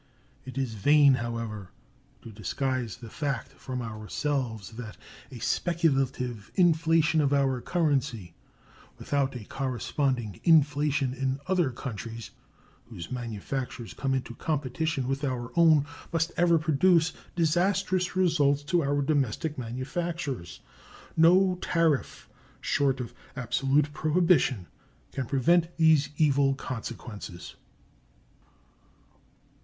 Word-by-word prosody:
It 130 +1 -8
is 130 -4 -1
vain, 145 +6 +5
however, 115 -5 -4 0.5
to 115 - -9
disguise 120 +3 -3
the 120 -2 -10
fact 140 -5 -3
from 125 -2 -6
ourselves 110 - -3
that 115 -1 -8 0.3
a 130 - -9
speculative 135 - 0
inflation 165 -2 +3
of 140 -2 +1
our 135 -3 +1
currency 140 - -1 0.6
without 140 -2 -1
a 120 - -6
corresponding 130 - -2
inflation 145 -4 +3
in 135 +1 -2
other 180 -5 +2
countries 115 -2 -7 0.5
whose 85 - -9
manufactures 120 +1 -5
come 135 -1 -1
into 125 -2 -4
competition 150 0 -2
with 135 +2 -2
our 125 -3 -2
own 160 -4 +5 0.3
must 165 0 0
ever 170 -1 +4
produce 160 +2 +3 0.2
disastrous 180 +2 +1
results 150 -6 +2
to 170 +3 +1
our 145 -1 0
domestic 145 +1 0
manufactures. 130 - -4 0.5
No 180 +3 +5
tariff 165 -5 0 0.3
short 135 -2 +1
of 120 - -7 0.2
absolute 135 +3 +1
prohibition 155 - +2 0.5
can 135 -3 -4
prevent 170 +7 +2
these 160 -3 +4
evil 140 -3 +3
consequences. 115 -8 -7
135 Hz, 105 wpm, -28 LUFS, 125-160 Hz, 0.6 s, vain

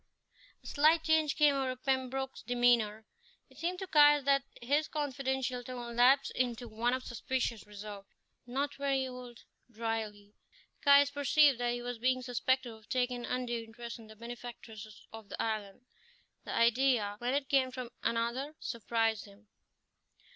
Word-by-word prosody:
A - - -25
slight 315 +2 +3
change 315 -2 +2
came 295 -2 +5
over 265 -2 -1
Pembroke's 265 0 -2
demeanour. 235 -3 +2 0.5
It - - -16
seemed 355 +2 -2
to 385 - -5
Caius 295 -3 +6
that 275 0 +4 0.2
his 290 +6 +1
confidential 265 -4 -2
tone 240 -1 -7
lapsed 270 +3 +5
into 245 -1 -2
one 235 +3 0
of 260 - -6
suspicious 240 -2 -3
reserve. 205 -1 -9 0.4
"Not 280 +4 -2
very 275 -1 0
old" 250 -2 -10 0.3
dryly. 220 -3 -4 0.5
Caius 280 0 +6
perceived 285 -1 +4
that 240 0 0
he 240 0 -5
was 245 -1 -5
being 255 +1 +1
suspected 250 0 0
of 220 -2 -17
taking 250 -1 0
an 240 - -6
undue 245 -2 -2
interest 235 +1 -9
in 225 - -13
the 220 - -13
benefactress 230 -2 -10
of 225 -2 -10
the - - -7
island. 215 0 -3 0.6
The - - -4
idea, 230 -3 +2
when 245 +2 0
it 280 -1 -1
came 265 -2 +3
from 255 -2 -7
another, 240 +6 -1
surprised 225 -2 -1
him. 205 +1 -18
245 Hz, 155 wpm, -32 LUFS, 230-270 Hz, 0.6 s, Caius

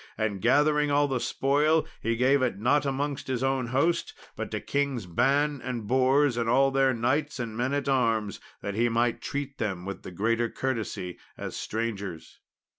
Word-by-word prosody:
And 105 -3 -1
gathering 150 +4 +3
all 145 0 +3
the 130 -3 -1
spoil, 150 +6 +2 0.2
he 115 0 0
gave 130 +4 +3
it 125 -6 0
not 140 +7 +2
amongst 140 +1 -2
his 130 -1 -1
own 135 -2 0
host, 140 +8 0 0.2
but - - -4
to - - -3
Kings 140 -6 -1
Ban 140 - +1
and 125 -4 -4
Bors 130 +2 +3
and 115 -1 0
all 135 +3 +4
their 135 0 +3
knights 130 +5 0
and 115 -3 -4
men 125 +3 -1
at 140 -1 -2
arms, 115 -6 +1 0.2
that 100 - -3
he 120 +3 +2
might 115 +1 +1
treat 140 -1 -4
them 95 -5 -2
with 100 0 -6
the - - -8
greater 115 +6 0
courtesy 110 -9 -3 0.2
as - - -6
strangers. 100 -7 -4
130 Hz, 180 wpm, -27 LUFS, 115-140 Hz, 0.2 s, all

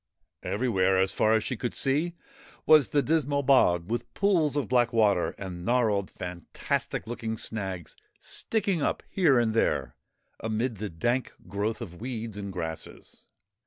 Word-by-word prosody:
Everywhere, 95 -2 +1
as 95 0 +2
far 110 +1 +3
as 110 - +1
she 125 - -2
could 120 +2 -4
see, 150 +6 0 0.5
was 155 -4 +6
the 145 -1 +2
dismal 145 -2 +1
bog, 90 -11 +4
with 120 +3 -3
pools 175 -8 +2
of 145 -6 0
black 120 -1 +3
water, 105 -6 +2
and 90 -3 -6
gnarled, 105 -3 +1
fantastic 90 -2 -4
looking 110 -1 -4
snags 95 -6 -4 0.2
sticking 200 -7 -1
up - - -1
here 165 -9 +4
and 115 -2 +2
there 115 - 0 0.4
amid 110 +1 -2
the 105 +1 -4
dank 120 +10 -1
growth 105 +4 -2
of 90 -4 -8
weeds 115 -3 -4
and 100 -1 -5
grasses. 80 -3 -7
115 Hz, 150 wpm, -28 LUFS, 95-130 Hz, 0.5 s, was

